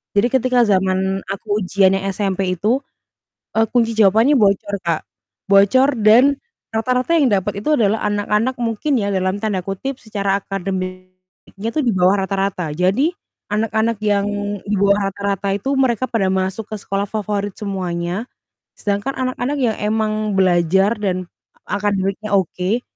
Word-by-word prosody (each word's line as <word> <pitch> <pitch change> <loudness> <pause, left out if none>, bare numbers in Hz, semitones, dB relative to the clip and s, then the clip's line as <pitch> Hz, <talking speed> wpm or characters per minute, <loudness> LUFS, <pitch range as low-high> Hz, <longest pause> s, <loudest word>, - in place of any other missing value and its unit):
Jadi 205 +4 +4
ketika 250 0 +2
zaman 190 0 +1
aku 205 +1 -2
ujiannya 195 +1 +2
SMP 190 -2 -1
itu, 215 +8 +1 0.8
eee, 225 - +3
kunci 230 -1 +2
jawabannya 220 +7 +5
bocor, 200 -1 +2
Kak, 165 -2 +1 0.5
bocor 255 +8 +5
dan 245 +7 +5 0.3
rata-rata 250 +5 0
yang 290 -4 +4
dapat 200 0 0
itu 305 - +2
adalah 220 -1 +2
anak-anak 210 +4 0
mungkin 235 +5 0
ya 200 - -1
dalam 185 0 0
tanda 210 -4 -1
kutip 250 +8 -4
"secara 200 -3 -1
akademik-nya 185 +1 -6
tuh 305 - +1
di 235 - +3
bawah 190 +2 +3
rata-rata." 195 -4 -2
Jadi 195 - +2 0.4
anak-anak 220 +1 0
yang 205 -1 +1 0.4
di 205 +1 -1
bawah 200 0 +3
rata-rata 200 0 -2
itu 235 +7 -3
mereka 255 -2 +1
pada 215 -5 +1
masuk 190 +3 -2
ke 215 - -3
sekolah 195 0 -1
favorit 205 -2 -3
semuanya, 185 0 -3 0.5
sedangkan 205 +5 -1
anak-anak 255 +2 -2
yang 235 -4 +1
emang 215 0 0
belajar 190 +3 +3
dan 185 -3 -2 0.4
akademiknya 205 0 -1
oke, 190 +5 -1
200 Hz, 140 wpm, -19 LUFS, 190-225 Hz, 0.8 s, jawabannya